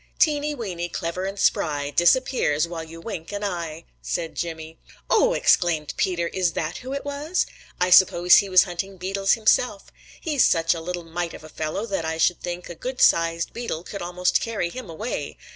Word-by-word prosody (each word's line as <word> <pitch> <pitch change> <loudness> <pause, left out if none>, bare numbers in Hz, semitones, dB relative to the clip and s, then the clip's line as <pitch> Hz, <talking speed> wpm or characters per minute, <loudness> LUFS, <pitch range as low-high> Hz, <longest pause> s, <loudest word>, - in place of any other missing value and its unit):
"Teeny 300 -1 +2
Weeny, 180 -8 -4
clever 170 +2 -3
and 195 +1 -4
spry, 145 -6 +1
Disappears 175 - +2
while 170 -1 -5
you 165 +1 -11
wink 165 -2 -7
an 205 0 -4
eye.' 170 -4 -4 0.2
said 165 -2 -3
Jimmy. 160 -1 -6 0.3
"Oh!" - - +4
exclaimed 165 - +2
Peter. 170 -2 0
"Is 180 -3 0
that 155 0 -3
who 255 +1 -8
it 280 - -4
was? 290 +5 -1 0.3
I 180 0 +1
suppose 180 -1 +7
he 200 - +2
was 185 -1 +7
hunting 190 +1 -5
beetles 195 +2 +1
himself. 220 -1 +1 0.3
He's 300 -6 +2
such 165 0 +3
a 165 - -6
little 175 +1 -4
mite 170 +1 -4
of - - -12
a 155 - -11
fellow 155 +8 -3
that 195 -6 -2
I 160 0 -2
should 175 +2 +2
think 175 0 -5
a - - -7
goodsized 170 -7 +1
beetle 230 -9 -4
could 200 - -7
almost 180 +1 0
carry 215 -7 -2
him 255 -4 -8
away. 215 +9 -5
175 Hz, 185 wpm, -24 LUFS, 165-205 Hz, 0.3 s, suppose